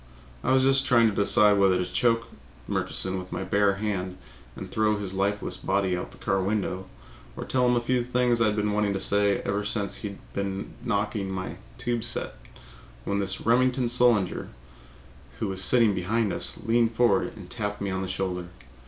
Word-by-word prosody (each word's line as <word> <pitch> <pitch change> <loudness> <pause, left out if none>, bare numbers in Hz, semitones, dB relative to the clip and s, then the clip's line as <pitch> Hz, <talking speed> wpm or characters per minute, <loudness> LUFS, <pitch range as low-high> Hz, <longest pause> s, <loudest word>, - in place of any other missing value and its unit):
I - - +1
was 130 0 +4
just 135 0 +3
trying 115 -2 +5
to 100 - -5
decide 105 0 +4
whether 95 -2 +4
to 90 - -1
choke 115 +6 +1 0.4
Murchison 95 0 -2
with 90 0 -9
my - - -3
bare 100 +1 +2
hand 95 -3 -3 0.4
and - - -8
throw 105 -1 +1
his 100 -2 -3
lifeless 100 +2 -1
body 95 -1 0
out 90 - -3
of - - -17
the - - -13
car 95 0 0
window, 95 -2 -2 0.5
or - - -5
tell 125 -1 +1
him 125 - +3
a 120 - +1
few 125 0 0
things 125 -1 +1
I 115 - +4
had 105 - 0
been 105 0 0
wanting 105 -1 +1
to 95 - -2
say 100 0 +2
ever 100 +1 -1
since 105 -1 -1
he 100 -2 -6 0.2
began 100 0 -4
knocking 105 -3 -1
my 95 -1 -5 0.2
tube 120 -2 -2
set, 120 - -2 0.7
when 100 0 -1
this 100 -1 -1
Remington 125 +2 +2
Solander, 120 -6 +2 0.9
who 110 - -2
was 95 0 -1
sitting 115 -1 +4
behind 100 +3 0
us, - - -1
leaned 115 0 +2
forward 110 -5 +2
and 95 -4 -10
tapped 105 -1 -3
me 100 -1 -2
on 95 0 -2
the 95 - -3
shoulder. 95 -1 -3
105 Hz, 195 wpm, -26 LUFS, 95-115 Hz, 0.9 s, trying